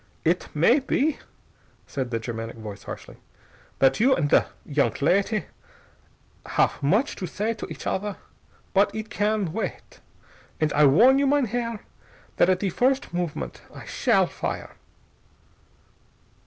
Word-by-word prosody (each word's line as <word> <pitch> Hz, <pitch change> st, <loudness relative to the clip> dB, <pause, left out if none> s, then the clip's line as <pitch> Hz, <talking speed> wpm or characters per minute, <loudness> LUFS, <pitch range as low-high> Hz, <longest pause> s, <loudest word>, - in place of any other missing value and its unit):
"Idt 175 Hz, +3 st, +1 dB
may 200 Hz, -, +5 dB
be," 280 Hz, +2 st, 0 dB, 0.7 s
said 130 Hz, -3 st, -4 dB
the 115 Hz, -, -1 dB
Germanic 115 Hz, 0 st, -5 dB
voice 105 Hz, -3 st, -8 dB
harshly, -, -, -9 dB, 0.6 s
"that 135 Hz, 0 st, +3 dB
you 265 Hz, +4 st, +5 dB
and 150 Hz, -3 st, -1 dB
the -, -, +5 dB, 0.2 s
young 140 Hz, -1 st, +2 dB
ladty 195 Hz, +5 st, +2 dB, 1.0 s
haff -, -, 0 dB
much 205 Hz, -, +2 dB
to 185 Hz, -, -4 dB
say 215 Hz, +6 st, -2 dB
to 220 Hz, -, -7 dB
each -, -, -8 dB
other. 200 Hz, +1 st, -2 dB, 0.6 s
But 200 Hz, +1 st, +3 dB
idt 220 Hz, 0 st, -5 dB
can 205 Hz, -5 st, 0 dB
wait. 220 Hz, -, -5 dB, 0.6 s
And 155 Hz, -1 st, +1 dB
I 150 Hz, 0 st, +6 dB
warn 245 Hz, -, +6 dB
you, 280 Hz, -, +2 dB
mein 285 Hz, -1 st, +3 dB
Herr, 230 Hz, -1 st, -3 dB, 0.6 s
that 175 Hz, -, +4 dB
at 185 Hz, -1 st, +2 dB
the 195 Hz, -3 st, 0 dB
first 265 Hz, -, +1 dB
movement 165 Hz, -, -4 dB
I -, -, -11 dB
shall -, -, +2 dB
fire." -, -, -5 dB
190 Hz, 140 wpm, -25 LUFS, 145-230 Hz, 1.0 s, I